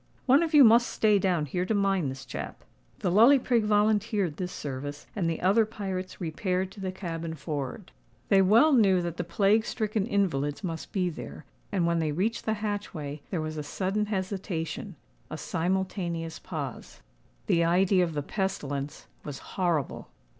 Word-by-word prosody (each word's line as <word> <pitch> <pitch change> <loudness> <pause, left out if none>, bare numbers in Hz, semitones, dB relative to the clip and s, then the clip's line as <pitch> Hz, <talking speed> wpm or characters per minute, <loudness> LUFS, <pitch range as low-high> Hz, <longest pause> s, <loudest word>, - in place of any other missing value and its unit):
One 275 +3 +5
of 325 -2 0
you 290 - +10
must 235 +1 +6
stay 210 -2 +3
down 180 -5 +1
here 180 +6 -2
to 215 +4 0
mind 195 -7 +1
this 135 +1 -7
chap." - - -7 0.4
The 180 - +1
Lully 230 +9 +7
Prig 240 -4 +1
volunteered 210 -4 +2
this 180 -1 -3
service; 145 +1 -6
and 180 -6 0
the 165 - -2
other 200 +5 +4
pirates 190 -4 -5
repaired 185 +2 -2
to 200 - -13
the 190 -1 -3
cabin 165 -3 -5
forward. 145 -3 -5 0.4
They 195 - +6
well 225 +11 +5
knew 195 -7 +4
that 170 -1 -4
the 175 - -1
plague 200 +5 +2
stricken 215 -2 -1
invalids 165 - 0
must 165 -3 -5
be 180 -3 0
there; 155 - -9 0.3
and 185 -4 +1
when 170 0 +1
they 155 -2 0
reached 205 +8 -1
the 220 - +1
hatchway, 160 -9 -4
there 175 -5 -2
was 155 0 -4
a - - -2
sudden 195 +7 -1
hesitation—a 180 - -5
simultaneous 170 -2 -2
pause. 145 -7 -7 0.4
The 170 - +3
idea 180 +2 +3
of 165 -3 -3
the 145 - -1
pestilence 145 -7 -3 0.2
was 145 -2 -6 0.2
horrible. 175 -7 -1
185 Hz, 170 wpm, -28 LUFS, 160-205 Hz, 0.4 s, you